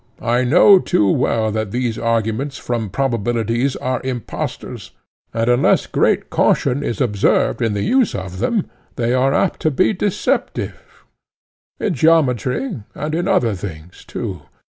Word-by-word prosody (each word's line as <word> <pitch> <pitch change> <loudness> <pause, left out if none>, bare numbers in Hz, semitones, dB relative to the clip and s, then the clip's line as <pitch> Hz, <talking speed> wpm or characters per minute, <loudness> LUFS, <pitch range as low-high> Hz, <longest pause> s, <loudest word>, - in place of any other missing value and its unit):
I 120 +2 +2
know 180 +9 +6
too 105 - +1
well 110 +3 +1
that 110 -1 -2
these 120 +1 -2
arguments 115 +5 -1
from 115 -4 -3
probabilities 120 +1 -1
are 130 -1 -2
impostors, 130 -3 -5 0.4
and 115 0 -1
unless 120 +1 +3
great - - 0
caution 140 +1 +2
is 120 - -3
observed 105 -7 +1
in 115 -3 +1
the 100 - -1
use 260 -3 +2
of 95 -1 -6
them, 210 - 0 0.3
they 120 -1 0
are 130 +1 +2
apt 180 +6 0
to 155 - +1
be 150 +8 +2
deceptive—in 200 0 -4
geometry, 155 - +1 0.2
and 150 +1 -4
in 175 +3 -1
other 180 - +2
things 90 -3 -8
too. 90 -5 -6
120 Hz, 140 wpm, -19 LUFS, 110-145 Hz, 0.4 s, know